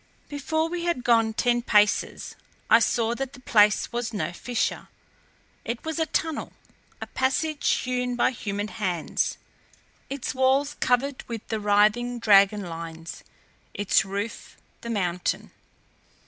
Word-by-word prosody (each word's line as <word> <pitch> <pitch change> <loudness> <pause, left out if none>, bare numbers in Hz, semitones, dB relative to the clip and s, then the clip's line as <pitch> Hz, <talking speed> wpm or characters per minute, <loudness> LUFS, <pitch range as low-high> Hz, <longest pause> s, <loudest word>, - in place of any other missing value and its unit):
Before 315 +3 -1
we 345 0 -4
had 340 -8 -1
gone 225 -2 +3
ten 240 0 +2
paces 210 -3 +2 0.4
I 230 - +8
saw 230 +1 +1
that 270 +2 -4
the - - -12
place 210 -4 +3
was 240 -1 -3
no 175 -4 -2
fissure. 245 +6 -2 0.8
It 235 +4 -5
was 320 0 -3
a 320 - +1
tunnel, 320 0 -2 0.5
a - - -5
passage 285 +3 0
hewn 250 -1 -2
by 240 - +2
human 205 -3 -4
hands, 185 -8 -2 0.7
its 275 -2 -4
walls 265 +2 +2
covered 255 +2 +1
with 230 -3 -6
the 220 - -1
writhing 210 +4 +2
dragon 205 -2 +4
lines, 165 0 -8 0.5
its 205 -1 +3
roof 200 +3 -5 0.2
the 235 - -7
mountain. 180 -5 -2
235 Hz, 135 wpm, -25 LUFS, 205-260 Hz, 0.8 s, I